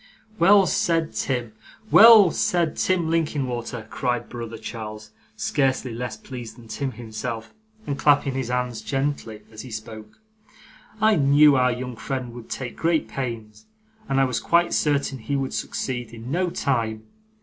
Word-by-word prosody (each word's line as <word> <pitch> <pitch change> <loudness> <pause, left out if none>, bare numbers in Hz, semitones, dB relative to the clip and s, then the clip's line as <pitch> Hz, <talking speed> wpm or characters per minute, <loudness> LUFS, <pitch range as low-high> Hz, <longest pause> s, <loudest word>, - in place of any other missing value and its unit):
'Well 195 +3 +6
said, 165 -1 0
Tim 120 -4 -2 0.4
well 220 -6 +9
said, 170 -3 0
Tim 175 -3 0
Linkinwater!' 125 -8 -2
cried 125 -2 -2
brother 115 -2 -6
Charles, 110 -2 -8 0.2
scarcely 130 +1 0
less 120 -1 -5
pleased 120 -2 -9
than 120 -2 -14
Tim 135 +3 -4
himself, 115 0 -6 0.3
and 140 - -3
clapping 145 -2 +3
his 130 -2 -3
hands 125 -2 -2
gently 135 -5 -3
as 110 -1 -9
he 130 - -10
spoke. 110 -1 -9 0.8
'I 220 -1 +4
knew 145 0 +6
our 125 -1 +3
young 125 0 -5
friend 125 +1 -5
would 120 -1 -11
take 125 -2 -5
great 165 -1 +1
pains, 110 -5 -6 0.4
and 135 - +2
I - - +5
was 125 -2 0
quite 175 0 +2
certain 140 -3 0
he 115 +6 -3
would 135 -1 -2
succeed, 125 -3 -4
in 115 +3 -8
no 180 +3 +1
time. 115 -9 -1
125 Hz, 150 wpm, -24 LUFS, 115-145 Hz, 0.8 s, well